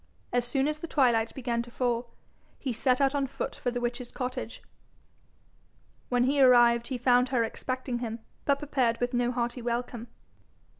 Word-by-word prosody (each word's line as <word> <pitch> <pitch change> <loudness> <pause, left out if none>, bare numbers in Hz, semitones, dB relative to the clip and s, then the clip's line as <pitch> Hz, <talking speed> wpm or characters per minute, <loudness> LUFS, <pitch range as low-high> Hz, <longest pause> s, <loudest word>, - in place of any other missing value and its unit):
As 245 0 +1
soon 270 +2 +1
as 305 0 -2
the 335 - -5
twilight 240 -7 +2
began 240 -3 -1
to 240 - -9
fall, 240 -1 -1 0.5
he 260 -3 -3
set 250 +3 +2
out 275 0 +3
on 280 -1 0
foot - - -4
for - - -2
the 245 0 -2
witch's 240 0 -3
cottage. 255 -1 -5 1.5
When 245 -1 +3
he 275 +2 +2
arrived, 240 -2 +6
he 260 - -3
found 250 +1 +3
her 250 -3 +2
expecting 255 +2 -3
him, 230 -2 -4 0.3
but 280 -1 +2
prepared 265 -5 0
with 245 +1 -1
no 245 0 +1
hearty 240 0 -2
welcome. 240 0 -3
245 Hz, 170 wpm, -28 LUFS, 240-260 Hz, 1.5 s, arrived